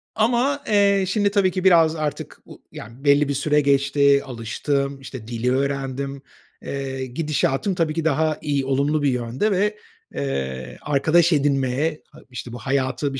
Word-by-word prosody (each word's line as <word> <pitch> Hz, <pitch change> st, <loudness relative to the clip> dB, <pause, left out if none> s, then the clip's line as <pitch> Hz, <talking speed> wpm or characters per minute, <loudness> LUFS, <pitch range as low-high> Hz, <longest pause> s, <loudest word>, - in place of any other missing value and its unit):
Ama, 245 Hz, +6 st, +1 dB
eee, 200 Hz, -2 st, +3 dB
şimdi 200 Hz, +1 st, +1 dB
tabii 195 Hz, -2 st, +2 dB
ki 185 Hz, +1 st, -3 dB
biraz 165 Hz, -4 st, +5 dB
artık 155 Hz, -3 st, -4 dB
u -, -, -14 dB
yani 115 Hz, +5 st, -11 dB
belli 145 Hz, 0 st, +4 dB
bir -, -, 0 dB
süre 150 Hz, +2 st, +2 dB
geçti, 140 Hz, 0 st, +3 dB
alıştım, 140 Hz, +3 st, -3 dB
işte, 130 Hz, -4 st, -9 dB
dili 120 Hz, +1 st, -1 dB
öğrendim. 135 Hz, 0 st, -2 dB, 0.4 s
Eee, 135 Hz, -1 st, -4 dB
gidişatım 150 Hz, -, -1 dB
tabii 165 Hz, -3 st, 0 dB
ki 165 Hz, 0 st, -3 dB
daha 155 Hz, 0 st, +1 dB
iyi, 140 Hz, -3 st, -1 dB
olumlu 140 Hz, +3 st, +1 dB
bir 145 Hz, -, +2 dB
yönde 125 Hz, -, -1 dB
ve, 205 Hz, +2 st, 0 dB, 0.4 s
eee, 65 Hz, -2 st, -4 dB
arkadaş 160 Hz, +4 st, +3 dB
edinmeye, 140 Hz, +1 st, 0 dB
a -, -, -15 dB
işte, 125 Hz, -1 st, -8 dB
bu -, -, -6 dB
hayatı 135 Hz, +2 st, -1 dB
bir 135 Hz, -, -4 dB
140 Hz, 160 wpm, -22 LUFS, 130-160 Hz, 0.4 s, biraz